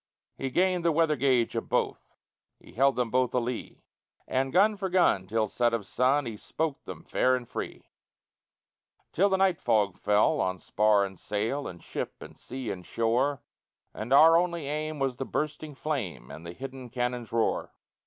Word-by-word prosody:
He 135 - -3
gained 180 +4 +1
the 170 - +3
weather 160 -1 +2
gage 130 -3 +2
of - - -3
both, - - -2 0.4
He - - -16
held 135 +3 +3
them 120 -3 -1
both 130 -1 +1
a - - +4
lee; 120 0 -5 0.4
And 135 +1 0
gun 205 +6 +4
for 195 -1 -3
gun, 175 - +3
till 110 +1 0
set 120 +2 +1
of 105 -4 -4
sun, 130 +7 +2
He 115 -3 -5
spoke 155 +5 -3
them - - -8
fair 130 0 +2
and 125 -2 -5
free; - - -6 1.2
Till 195 +5 +3
the 190 - +2
night 190 -2 +2
fog 105 -5 +2
fell 105 0 +3
on 95 0 -1
spar 105 +1 +2
and 95 -2 -9
sail, 115 +7 -2
And 85 -1 -10
ship, - - -5
and - - -12
sea, 130 -2 -6
and 90 - -7
shore, 125 +8 0 0.5
And 110 +4 -6
our 160 +4 +8
only 170 -3 0
aim 155 +1 -3
was 135 -3 -1
the 135 - -3
bursting 150 0 -3
flame 105 - -4
And 85 +2 -9
the 85 - -7
hidden 130 +3 -8
cannon's 125 -1 -3
roar. 115 -1 0
130 Hz, 185 wpm, -28 LUFS, 115-155 Hz, 1.2 s, our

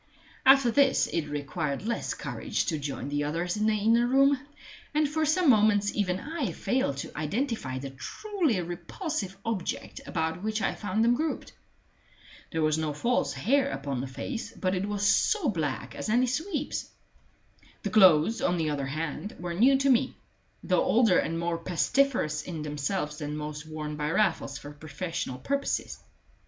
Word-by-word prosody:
After 270 -3 +7
this 275 +1 +4
it 165 -3 -2
required 145 +1 -3
less 235 +1 -2
courage - - -2
to 160 -5 -1
join 140 -1 -4
the 145 0 0
others 170 +4 -1
in 215 +1 +1
the 220 - +3
inner 230 +3 +3
room; 275 +2 +4 0.6
and 305 0 +3
for 310 +1 0
some 340 +3 +2
moments 210 -4 +4
even 185 -3 0
I 300 - -3
failed 250 - 0
to - - -6
identify 155 - -2
the 135 +1 -6
truly 320 - -1
repulsive 195 - -4
object 220 -6 -3
about 160 0 -2
which 215 +1 -1
I - - 0
found 210 +2 -1
them 235 +1 +5
grouped. 310 +5 -2 1.0
There 160 -1 0
was 155 0 +2
no 155 -2 -1
false 235 - 0
hair 275 +3 +2
upon 135 -1 -3
the 135 - -4
face, 225 - -5
but 185 -1 -1
it 195 +2 -1
was 205 -1 -2
as 205 - +4 0.2
black 150 -6 -3
as - - -5
any 245 +3 +4
sweep's. 295 +4 -2 0.9
The 205 - -2
clothes, 190 +1 +6
on 175 0 +1
the 155 -2 0
other 140 -2 -2
hand, 155 +7 -4
were 175 0 -4
new 255 +9 +5
to 275 +1 +2
me, 255 +1 +2 0.5
though - - +2
older 225 -6 +4
and 165 +1 -1
more 170 0 -1
pestiferous 175 - +1
in 160 -3 -6
themselves 150 +1 -2
than 150 0 -4
most 150 0 -6
worn 150 -1 -5
by 150 0 -1
Raffles 165 -6 +1
for 145 - -9
professional 150 -2 -5
purposes. 280 - -2
185 Hz, 170 wpm, -28 LUFS, 150-245 Hz, 1.0 s, After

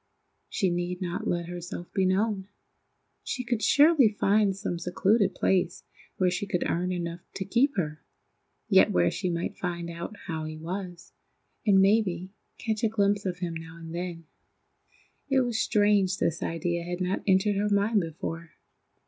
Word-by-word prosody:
She 190 -4 +1
need 175 +1 -2
not 180 -1 -3
let 175 -1 0
herself 175 0 -7
be 190 -2 +2
known. 195 0 0 0.7
She 250 - -3
could 240 -2 -1
surely 285 +1 +6
find 205 -1 +2
some 195 -3 -3
secluded 190 +3 +2
place 180 -2 +1 0.3
where 185 -1 +2
she 180 +3 -2
could 180 -3 -1
earn 180 +2 0
enough 170 -1 -3 0.2
to 190 - -3
keep 250 +6 +2
her, 155 -4 -2 0.7
yet - - +5
where 90 0 +3
she 185 - -2
might 170 0 -3
find 170 -1 -3
out 170 +5 -7
how 160 -3 -3
he 155 0 -6
was, 175 +2 -6 0.5
and 195 -2 +6
maybe 190 -3 +2 0.3
catch 220 -2 -2
a 225 - +4
glimpse 205 -2 +1
of 180 -1 -2
him 175 -2 -3
now 165 0 -8
and 165 -1 -9
then! 170 -1 -5 1.0
It 270 -1 +4
was 240 -3 -1
strange 205 -3 +3
this 170 -3 0
idea 170 +1 -1
had 175 +1 -4
not 185 +1 -1
entered 195 +1 +3
her 210 +1 +1
mind 205 +1 +3
before. 165 0 -6
185 Hz, 165 wpm, -27 LUFS, 170-205 Hz, 1.0 s, surely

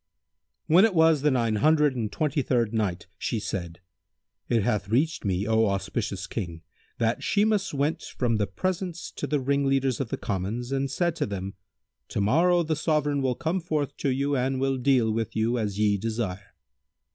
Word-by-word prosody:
When 170 +4 +6
it 220 -4 +3
was 160 -3 +5
the 150 - +3
Nine 115 -5 +1
Hundred 150 +2 +3
and 110 -4 -2
Twenty 150 -2 0
third 120 -4 0
Night, 105 -5 -1
She 115 - -1
said: 85 -4 -5 0.7
It 115 -3 +2
hath 100 -1 -1
reached 145 +8 +1
me, 95 0 0
O 110 0 +3
auspicious 100 0 -2
King, 85 -4 -5 0.3
that 115 0 0
Shimas 210 -1 +1
went 145 +2 -1
from 115 -3 -1
the 105 -1 0
presence 180 - -3
to - - -5
the 150 - +1
ringleaders 135 -1 +1
of 135 -5 -2
the - - -2
commons 105 +6 -3
and 135 0 0
said 170 +3 0
to - - -1
them, 100 -1 -5 0.5
"To - - -3
morrow 170 - +3
the 160 -1 -1
Sovran 150 -2 0
will 130 -2 0
come 170 +3 -1
forth 150 -4 -2
to 140 - -1
you 140 +2 0
and 130 0 0
will 135 0 +1
deal 125 -3 +3
with 115 0 -2
you 115 +2 +1
as 105 -3 -2
ye 105 -1 +2
desire." 105 -3 -4
125 Hz, 180 wpm, -26 LUFS, 105-150 Hz, 0.7 s, When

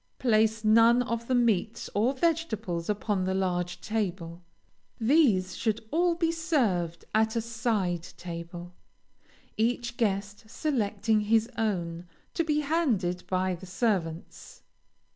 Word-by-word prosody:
Place 220 -2 +2
none 230 +3 +5
of 235 -1 -3
the 255 - +1
meats 230 -2 +1
or 235 +7 +1
vegetables 225 - -1
upon 205 -2 0
the 190 0 0
large 180 -2 -1
table. 180 -6 -3 0.6
These 220 - +3
should 220 +1 -1
all 345 +2 +2
be 330 -1 +1
served 230 - 0
at 220 +1 +2
a - - +2
side 215 -7 -1
table, 170 0 -7 0.8
each 240 +2 0
guest 205 -1 -2
selecting 220 -6 0
his 225 +2 +2
own, 175 -6 -2 0.3
to 335 - +1
be 300 -1 +1
handed 235 - 0
by 185 0 0
the 180 +2 -9
servants. 180 -5 -3
215 Hz, 125 wpm, -28 LUFS, 185-240 Hz, 0.8 s, none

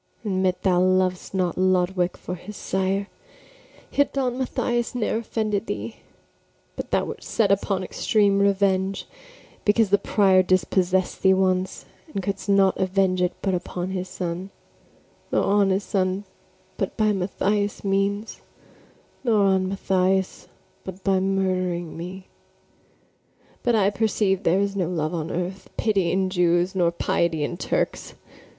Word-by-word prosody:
Admit 185 -2 0
thou 180 -2 +3
lov'dst 185 0 +1
not 185 -3 -1
Lodowick 185 -1 +1
for - - -6
his 185 +3 -9
sire, 190 +1 -1 0.9
Yet 285 - +1
Don 255 -3 0
Mathias 240 -2 -1
ne'er 225 -2 0
offended 215 -3 -2
thee: 105 +2 -5 0.8
But - - -6
thou - - +1
wert - - -7
set 205 -4 +1
upon 195 -1 +1
extreme 200 +1 +2
revenge, 195 -1 +1 0.6
Because 210 -1 +3
the 200 - +5
prior 190 -2 +4
dispossess'd 185 0 +1
thee 190 0 +5
once, 185 0 0 0.3
And 195 - -3
couldst 200 -1 -4
not 195 -1 +4
venge 190 -1 +1
it 180 0 +1
but 195 - +1
upon 180 +1 -3
his 185 -1 -4
son; 180 +1 -4 0.8
Nor - - +2
on 200 0 +3
his 195 +1 +1
son 190 -1 -1 0.5
but - - -3
by 215 -2 +3
Mathias' 205 +2 -1
means; 200 +2 -1 0.8
Nor 220 -5 +3
on 190 -1 +2
Mathias 190 -1 0 0.4
but 190 0 -9
by 195 -1 +2
murdering 185 -3 -1
me: 185 +3 -7 1.4
But 240 -1 +2
I 200 -2 +3
perceive 205 -2 +1
there 185 +2 +2
is 200 0 -1
no 180 -4 0
love 160 -2 -2
on 160 -1 -3
earth, 180 +2 -4
Pity 195 -6 +1
in 190 0 0
Jews, 175 0 +2
nor 180 -3 +2
piety 170 -2 0
in 160 - -2
Turks. - - -2
190 Hz, 140 wpm, -24 LUFS, 180-200 Hz, 1.4 s, the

